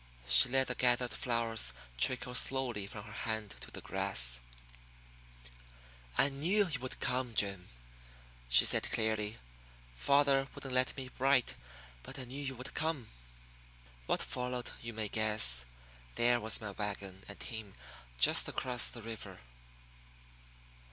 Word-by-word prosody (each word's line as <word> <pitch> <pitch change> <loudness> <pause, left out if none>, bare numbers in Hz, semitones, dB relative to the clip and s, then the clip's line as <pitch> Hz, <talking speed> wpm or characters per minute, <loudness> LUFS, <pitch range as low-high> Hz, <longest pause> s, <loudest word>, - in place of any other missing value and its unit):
She 60 - +8
let 135 +1 +2
the 125 - -1
gathered 125 0 +1
flowers 115 - -1 0.2
trickle 125 - +1
slowly 125 -5 +1
from 105 0 -9
her 105 -1 -12
hand 110 -2 -4
to - - -9
the - - -9
grass. - - 0 1.8
"I 135 - +5
knew 175 +9 +1
you 150 -6 -3
would 130 0 -7
come, 125 -3 -2
Jim," 100 -3 +1 0.8
she - - +8
said - - +3
clearly. 110 -1 -2 0.6
"Father 135 - +2
wouldn't 135 -2 -7
let 130 +2 +1
me 130 -1 -7
write, 135 -1 +2 0.5
but 135 - -10
I 130 - -4
knew 130 +3 -7
you 135 -2 -4
would 125 +2 -8
come." 155 -7 -2 1.0
What - - 0
followed 125 0 -4
you 115 - -6
may 110 -1 -4
guess 105 - +4 0.5
there 120 0 +3
was 110 +1 +3
my 105 -2 -6
wagon 100 -2 -6
and 100 - -10
team 110 -4 -7 0.4
just - - +5
across 125 -1 -1
the 120 - -10
river. 115 -1 -8
120 Hz, 140 wpm, -33 LUFS, 105-130 Hz, 1.8 s, She